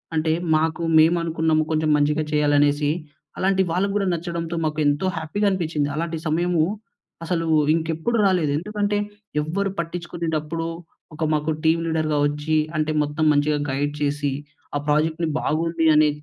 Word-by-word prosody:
అంటే 160 0 +1 0.2
మాకు 160 +2 0 0.2
మేము 165 +2 +5
అనుకున్నాము 160 -1 +1
కొంచెం 155 0 +1
మంచిగా 150 +2 +1
చేయాలనేసి. 145 0 +3 0.5
అలాంటి 190 0 +2
వాళ్ళకి 195 +3 0
కూడా 200 -2 +1
నచ్చడంతో 170 0 -3
మాకు 155 0 -1
ఎంతో 145 +5 +1
హ్యాపీగా 160 +7 -2
అనిపిచ్చింది. 160 -6 -1
అలాంటి 165 0 -2
సమయము 170 +1 +1 0.6
అసలు 165 -1 -1 0.3
ఇంకెప్పుడూ 165 +8 -1
రాలేదు. 180 -6 +2
ఎందుకంటే 205 +3 -1 0.4
ఎవ్వరు 195 +6 -1
పట్టించుకునేటప్పుడు, 165 -1 -3 0.5
ఒక 160 - -3
మాకు 150 +1 0
టీమ్ 165 +1 +3
లీడర్‌గా 155 -2 0
వచ్చి, 150 +2 -1 0.2
అంటే 155 0 0
మొత్తం 150 +2 -1
మంచిగా 145 +1 +1
గైడ్ 145 +2 -1
చేసి, 145 -1 0 0.4
ఆ - - +1
ప్రాజెక్ట్‌ని 160 +2 +1
బాగుంది 165 +1 0
అని 150 0 +5
160 Hz, 135 wpm, -23 LUFS, 150-170 Hz, 0.6 s, మేము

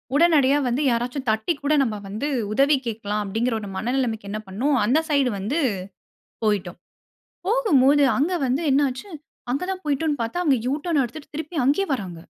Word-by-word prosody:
உடனடியா 290 -4 +4
வந்து 245 +4 0
யாராச்சும் 245 +3 -2
தட்டிக் 220 +9 0
கூட 290 +1 +2
நம்ப 220 -4 -2
வந்து 215 +9 -3 0.3
உதவி 280 +5 +4
கேட்கலாம். 210 -2 -2
அப்டிங்குற 225 +5 -1
ஒரு 205 - -7
மனநிலைமைக்கு 230 -3 -2
என்ன 215 - -3
பண்னோம், 255 +9 0
அந்த 260 +9 +3
சைடு 280 -3 +3
வந்து 255 +12 -1 0.9
போய்ட்டோம். 195 -5 -1 0.7
போகும்போது, 290 - +4
அங்க 315 +7 +1
வந்து 265 +6 0
என்ன 285 +2 +4
ஆச்சு? 260 +11 -8 0.4
அங்க 280 - -1
தான் 375 0 -4
போய்ட்டோன்னு 295 -1 0
பாத்தா, 230 +9 -3
அவுங்க 280 -6 +3
யூ 275 - +1
டர்ன் 305 -5 +2
எடுத்துட்டு 285 +5 -9
திருப்பி 315 +1 -5
அங்கேயே 390 +9 +2
வராங்க. 190 -8 -6
270 Hz, 165 wpm, -23 LUFS, 225-295 Hz, 0.9 s, உடனடியா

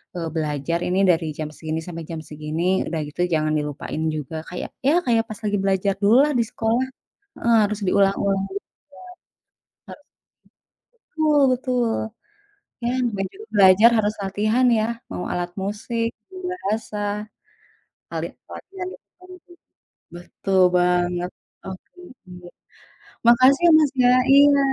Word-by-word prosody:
eee, 165 -2 -3
belajar 155 +2 -1
ini 185 +2 0
dari 165 -2 +3
jam 155 -1 -3
segini 160 0 -4
sampai 165 -1 -6
jam 160 - -4
segini, 155 +5 -1
udah 165 - -3
gitu 155 +4 -5
jangan 155 -1 +1
dilupain 150 +1 -4
juga, 150 +1 -6
kayak 180 - -6 0.2
ya 335 +5 +4
kayak 230 -2 +2
pas 215 - -7
lagi 205 -1 0
belajar 195 0 +1
dululah 260 +8 +5
di - - +3
sekolah. 230 +3 0 0.6
Heeh, 235 -1 +3
harus 210 +1 -3
diulang-ulang 195 0 +2
gitu - - -2 1.1
ya. - - -15
Harus 295 - -17 0.9
betul 310 -11 0
betul, 250 -2 -1 1.0
ya 240 - 0 0.3
baju 195 - -4 0.2
belajar 195 +3 +7
harus 210 0 +1
latihan 215 +6 +1
ya, 215 - +1 0.3
mau 180 - -4
alat 175 0 -2
musik, 230 +3 -2 0.2
mau 375 0 -10
bahasa. 215 - -4 1.2
Paling - - -4
kuatnya 380 -1 -10
di - - -10 0.2
mana. 365 0 -13 0.8
Betul 190 +2 -2 0.2
banget, 180 0 +1 0.3
oke, 190 -1 -10 0.4
iya. 180 -1 -11 0.8
Makasih 260 +8 +6
Mas 300 -3 +3
ya 245 - +6 0.2
iya, 285 0 +6
200 Hz, 130 wpm, -22 LUFS, 175-240 Hz, 1.2 s, belajar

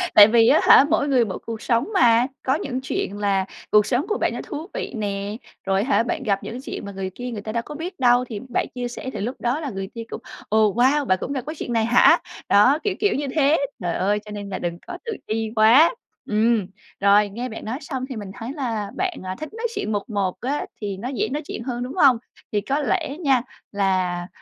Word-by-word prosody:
Tại 205 -1 +11
vì 230 0 +5
á - - +6
hả, 275 - +8
mỗi 295 -2 +2
người 255 -4 +3
mỗi 195 - -5
cuộc 225 -1 -5
sống 235 - +1
mà, 240 -6 +5 0.2
có 265 +2 +2
những 260 -4 -3
chuyện 205 -6 -3
là 195 -2 +1 0.3
cuộc 210 -1 +6
sống 255 +3 0
của 430 - 0
bạn - - 0
nó - - -4
thú 315 +4 -6
vị - - -4
nè, 205 0 -3 0.3
rồi 195 +1 +1
hả 255 -2 +2
bạn 315 +1 -3
gặp 200 -4 0
những 245 +3 -6
chuyện 220 - -6
mà 200 - -6
người 190 -1 -4
kia 245 0 -5
người 210 -3 -5
ta 215 - -5
đâu 230 +1 -2
có 300 - -8
biết 340 +2 -6
đâu, 245 0 +4
thì 225 -4 -6
bạn - - 0
chia 245 -1 -2
sẻ 245 +2 -6
thì - - -5
lúc 240 +7 -3
đó 245 +5 0
là 300 -3 -4
người 195 -4 -5
kia 230 - -5
cũng - - -6 0.3
"Ồ, 215 -2 +3
wow! 270 +5 +3
Bạn 185 -3 +2
cũng 275 - -4
gặp 265 - -2
cái 315 - -4
chuyện 240 - -4
này 225 -1 +2
hả?", 240 +1 +6 0.3
đó, 255 +9 +5
kiểu 405 -3 0
kiểu 410 - +2
như 285 0 -2
thế, 300 +1 +4 0.2
trời 175 -1 -1
ơi, 205 +3 +1
cho 210 - -9
nên 205 -1 -6
là 190 - -4
đừng 170 -1 -3
có 360 - -6
tự 460 - -3 0.2
ti 220 0 -1
quá! 245 - +6 0.3
Ừm, 215 -2 +2 0.3
rồi, 200 +1 +4
nghe 240 +5 -5
bạn 225 - -8
nói 225 +4 -3
xong 260 -5 -4
thì 260 - -5
mình 205 -3 -6
thấy 230 +4 -7
là 225 -8 -3
bạn, 375 -2 -1
à, 185 0 -4
thích 310 - -5
nói 460 +1 -2
chuyện 400 - -2
1-1 200 -2 -2
á 275 +4 -2 0.2
thì 200 -2 -3
nó 235 +6 -5
dễ 265 - -1
nói 295 +3 -2
chuyện - - -5
hơn, 245 -1 -3
đúng 255 - -5
hông? 275 -9 +6 0.3
Thì 205 -1 +1
có 275 +7 -1
lẽ 315 -2 -1
nha 270 -7 +3 0.3
là, 185 -3 0
235 Hz, 250 wpm, -23 LUFS, 205-275 Hz, 0.3 s, Tại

